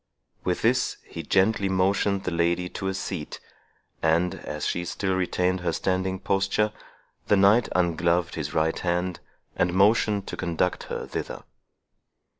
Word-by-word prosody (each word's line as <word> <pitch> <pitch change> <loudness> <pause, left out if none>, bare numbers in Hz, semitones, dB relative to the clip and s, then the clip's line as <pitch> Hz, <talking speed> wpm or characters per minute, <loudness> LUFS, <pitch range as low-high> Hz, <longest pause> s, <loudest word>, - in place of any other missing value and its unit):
With - - -1
this, - - +2
he - - -7
gently 100 +1 +2
motioned 95 +1 +1
the 90 - -2
lady 85 +1 +1
to 95 - -4
a 95 - 0
seat; 95 -4 -5 0.6
and, 85 +2 +2
as 75 - -5
she 90 - -1
still 95 +2 -2
retained 95 0 0
her 90 -2 -1
standing 95 +2 -1
posture, 100 +3 0 0.5
the 105 - +4
knight 100 +5 +5
ungloved 85 0 +1
his 75 -3 -4
right 80 0 +1
hand, 90 0 -1 0.4
and 90 0 +1
motioned 105 0 +3
to - - -5
conduct 85 +1 -1
her - - -4
thither. - - -5
90 Hz, 145 wpm, -26 LUFS, 85-95 Hz, 0.6 s, knight